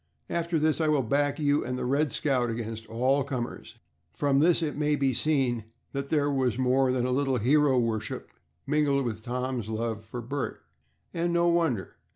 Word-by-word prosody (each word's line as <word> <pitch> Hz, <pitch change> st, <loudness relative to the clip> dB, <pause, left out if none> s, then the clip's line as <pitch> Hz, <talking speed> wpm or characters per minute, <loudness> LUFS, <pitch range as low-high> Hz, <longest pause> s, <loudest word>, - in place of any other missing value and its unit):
After 170 Hz, 0 st, 0 dB
this 155 Hz, +1 st, +1 dB
I 160 Hz, -, +2 dB
will 150 Hz, -3 st, +2 dB
back 140 Hz, +4 st, +1 dB
you 145 Hz, -1 st, +2 dB
and 125 Hz, +1 st, -3 dB
the -, -, -3 dB
'Red 140 Hz, +4 st, +1 dB
Scout' 130 Hz, -5 st, +1 dB
against 115 Hz, -1 st, -5 dB
all 130 Hz, +5 st, +1 dB
comers." 125 Hz, -3 st, -5 dB, 0.4 s
From 140 Hz, -1 st, +2 dB
this 165 Hz, +2 st, +4 dB
it 150 Hz, -, -2 dB
may 150 Hz, 0 st, +1 dB
be 135 Hz, -2 st, +1 dB
seen 125 Hz, -4 st, +1 dB, 0.3 s
that 140 Hz, 0 st, -4 dB
there 145 Hz, -2 st, +2 dB
was 130 Hz, -4 st, 0 dB
more 130 Hz, 0 st, +2 dB
than 125 Hz, -1 st, 0 dB
a 125 Hz, -, 0 dB
little 135 Hz, 0 st, +1 dB
hero 135 Hz, +3 st, +3 dB
worship 110 Hz, -3 st, -2 dB, 0.3 s
mingled 140 Hz, -2 st, +1 dB
with 110 Hz, -2 st, -4 dB
Tom's 125 Hz, -2 st, -3 dB
love 110 Hz, 0 st, -3 dB
for 120 Hz, +2 st, -7 dB
Bert, 140 Hz, +4 st, -4 dB, 0.5 s
and 170 Hz, 0 st, 0 dB
no 170 Hz, 0 st, +3 dB
wonder. 160 Hz, -, 0 dB
135 Hz, 185 wpm, -28 LUFS, 120-150 Hz, 0.5 s, this